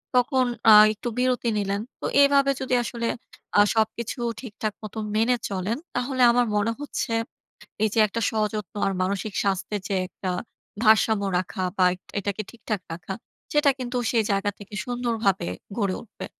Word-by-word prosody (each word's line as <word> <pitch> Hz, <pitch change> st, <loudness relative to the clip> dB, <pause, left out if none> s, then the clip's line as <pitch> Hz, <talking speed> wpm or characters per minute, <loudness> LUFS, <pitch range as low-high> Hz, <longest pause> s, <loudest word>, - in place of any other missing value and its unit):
তখন 255 Hz, +1 st, +3 dB, 0.3 s
আ -, -, +11 dB, 0.2 s
একটু 215 Hz, -, -7 dB
বিরতি 250 Hz, -1 st, +1 dB
নিলেন। 200 Hz, 0 st, -1 dB, 0.2 s
তো -, -, -4 dB, 0.2 s
এভাবে 280 Hz, -1 st, +5 dB
যদি 260 Hz, -1 st, -2 dB
আসলে 235 Hz, -1 st, -3 dB, 0.5 s
আ -, -, +9 dB
সবকিছু 225 Hz, +3 st, -1 dB, 0.2 s
ঠিকঠাক 215 Hz, -3 st, -4 dB
মত 215 Hz, -2 st, -8 dB, 0.2 s
মেনে 230 Hz, +3 st, +3 dB
চলেন। 195 Hz, +3 st, -2 dB, 0.2 s
তাহলে 255 Hz, +1 st, -1 dB
আমার 245 Hz, +1 st, +3 dB
মনে 210 Hz, +2 st, +2 dB
হচ্ছে, 290 Hz, -5 st, -3 dB, 0.7 s
এইযে 220 Hz, +1 st, +1 dB
একটা 230 Hz, +3 st, -3 dB
সযত্ন 215 Hz, -3 st, -2 dB
আর 195 Hz, -, 0 dB
মানসিক 200 Hz, +2 st, -2 dB
স্বাস্থ্যের 200 Hz, +1 st, -1 dB
যে 200 Hz, -, -1 dB
একটা 185 Hz, 0 st, -4 dB, 0.5 s
ভারসাম্য 220 Hz, -1 st, +4 dB
রাখা 185 Hz, +2 st, -3 dB
বা, 185 Hz, -, +5 dB
এট 185 Hz, -, -12 dB, 0.2 s
এটাকে 200 Hz, +1 st, -2 dB
ঠিকঠাক 220 Hz, -4 st, -4 dB
রাখা। 170 Hz, +3 st, -5 dB, 0.4 s
সেটা 295 Hz, -1 st, +5 dB
কিন্তু 250 Hz, 0 st, -3 dB
সেই 230 Hz, -2 st, +3 dB
জায়গা 195 Hz, +1 st, +1 dB
থেকে 205 Hz, 0 st, -12 dB
সুন্দরভাবে 235 Hz, -5 st, 0 dB, 0.3 s
গড়ে 200 Hz, -4 st, 0 dB
উঠবে। 230 Hz, -, -9 dB
220 Hz, 155 wpm, -25 LUFS, 200-245 Hz, 0.7 s, আ